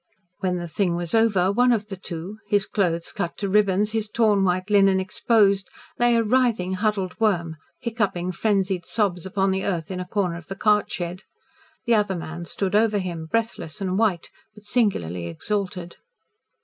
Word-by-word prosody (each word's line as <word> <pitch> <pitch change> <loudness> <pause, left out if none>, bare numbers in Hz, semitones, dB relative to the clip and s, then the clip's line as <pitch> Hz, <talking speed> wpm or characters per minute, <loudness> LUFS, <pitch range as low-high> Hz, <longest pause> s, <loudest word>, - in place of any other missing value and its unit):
When 180 -1 0
the 175 0 -4
thing 175 +1 0
was 175 -1 -3
over, 205 -5 +3
one 245 +4 +3
of 215 -3 0
the 195 - -4
two 185 +3 -7
his 205 -1 +2
clothes 170 -5 -1
cut 170 - -4
to 200 - -2
ribbons, 205 +1 +2
his 220 -1 -1
torn 215 -3 +3
white 185 +2 0
linen 195 -2 +5
exposed, 200 0 +2 0.3
lay, 240 0 +4
a 230 - +3
writhing, 225 -5 +1
huddled 195 -2 -1
worm, 175 -7 +1 0.2
hiccoughing 205 -6 -1
frenzied 190 -1 0
sobs 190 -5 -1
upon 195 0 +1
the 190 0 -1
earth 175 -3 -2
in 185 - -4
a 180 - -5
corner 180 -4 -1
of 170 - -12
the 195 - -5
cart 210 -1 +2
shed. 175 +1 -4 0.6
The 235 - +3
other 205 -3 +2
man 170 0 -6
stood 190 +3 -3
over 215 0 +3
him, 170 -4 -4
breathless 225 -5 -2
and 190 -2 -1
white, 200 -5 0 0.2
but 210 - -15
singularly 90 - 0
exalted. 180 - -3
195 Hz, 175 wpm, -24 LUFS, 180-210 Hz, 0.6 s, linen